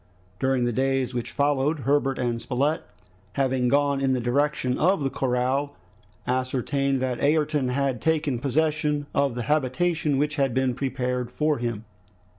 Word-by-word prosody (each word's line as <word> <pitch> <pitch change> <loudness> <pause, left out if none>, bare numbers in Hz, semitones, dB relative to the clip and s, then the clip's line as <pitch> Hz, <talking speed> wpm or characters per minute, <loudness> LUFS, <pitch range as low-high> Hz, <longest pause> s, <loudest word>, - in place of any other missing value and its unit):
During 130 -1 +1
the 120 - 0
days 135 0 0
which 120 -1 -3
followed, 145 +1 +1
Herbert 135 +1 +1
and 120 -2 -1
Spilett 140 +6 0 0.5
having 130 -2 +1
gone 140 +1 +2
in 135 -1 +2
the 130 - 0
direction 130 +1 0
of 180 -1 +2
the 135 - 0
corral, 135 +2 0 0.5
ascertained 130 +2 0
that 125 0 -2
Ayrton 150 -2 +2
had 130 -2 -1
taken 155 -6 +1
possession 150 +2 0
of 140 -3 +1
the 120 - -3
habitation 150 +2 +1
which 150 +2 0
had 135 -3 +1
been 130 -1 +1
prepared 125 -2 -2
for 150 -1 0
him. 115 -2 -3
135 Hz, 150 wpm, -25 LUFS, 125-145 Hz, 0.5 s, gone